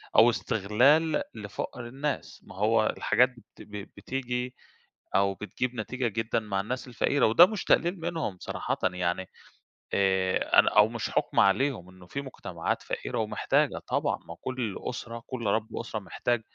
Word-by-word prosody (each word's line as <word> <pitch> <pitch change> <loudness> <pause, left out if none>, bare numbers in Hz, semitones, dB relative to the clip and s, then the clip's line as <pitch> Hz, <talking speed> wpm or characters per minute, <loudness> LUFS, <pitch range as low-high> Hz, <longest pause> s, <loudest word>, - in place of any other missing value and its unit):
أو - - +8
استغلال 140 +11 +3
لفقر 110 +3 -6
الناس، 140 +4 -4
ما - - -13
هو - - +3
الحاجات 125 +2 +4
بت 110 - -17
ب - - -14 0.3
بتيجي 125 +2 -3 0.6
أو 100 0 +3
بتجيب 125 +4 -3
نتيجة 125 +3 -2
جدًا 115 +1 -1
مع 100 -3 -2
الناس 125 +5 -4
الفقيرة 130 +3 +2
وده 115 +11 +8
مش 215 -2 -4
تقليل 175 +2 +3
منهم 160 - -2
صراحةً - - -3
يعني 90 +1 0 0.6
آآ 95 -1 +3
أنا - - +6
أو 105 0 +8
مش 115 -1 -3
حكم - - +1
عليهم 105 -2 +2
إنه 90 -1 -15
في 140 +10 -4
مجتمعات 135 -2 -4
فقيرة - - -3
ومحتاجة، - - +1
طبعًا، - - 0
ما 85 - -7
كل 125 -6 -3
أسرة، 115 -1 -6
كل 120 -3 -5
رب 110 +2 0
أسرة 115 -2 -4
محتاج 120 +3 -1
115 Hz, 150 wpm, -28 LUFS, 100-130 Hz, 0.6 s, أو